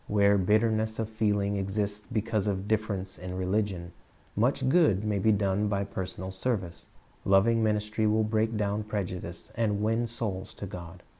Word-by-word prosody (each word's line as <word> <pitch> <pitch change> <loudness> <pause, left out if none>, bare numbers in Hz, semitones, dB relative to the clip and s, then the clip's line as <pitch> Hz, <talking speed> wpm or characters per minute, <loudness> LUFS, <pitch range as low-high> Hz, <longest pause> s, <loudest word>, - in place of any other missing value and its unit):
Where 100 -1 +4
bitterness 110 +2 +2
of 110 -1 -2
feeling 105 -2 +1
exists 100 +1 -2
because 110 -2 0
of 100 0 -1
difference 105 -3 -1
in 90 +1 -5
religion, 95 -2 -1 0.4
much 130 +4 +1
good 130 - +4
may 105 -2 0
be 110 +3 +4
done 100 0 +1
by 100 -1 0
personal 95 -1 -5
service. 95 -4 -3 0.4
Loving 105 +4 +4
ministry 110 0 +1
will 110 +1 +3
break 110 +1 0
down 105 0 0
prejudice, 90 -5 -4
and 105 -3 0
win 115 +2 +1
souls 105 -5 -4
to - - -6
God. 90 -1 -9
105 Hz, 155 wpm, -29 LUFS, 95-110 Hz, 0.4 s, Where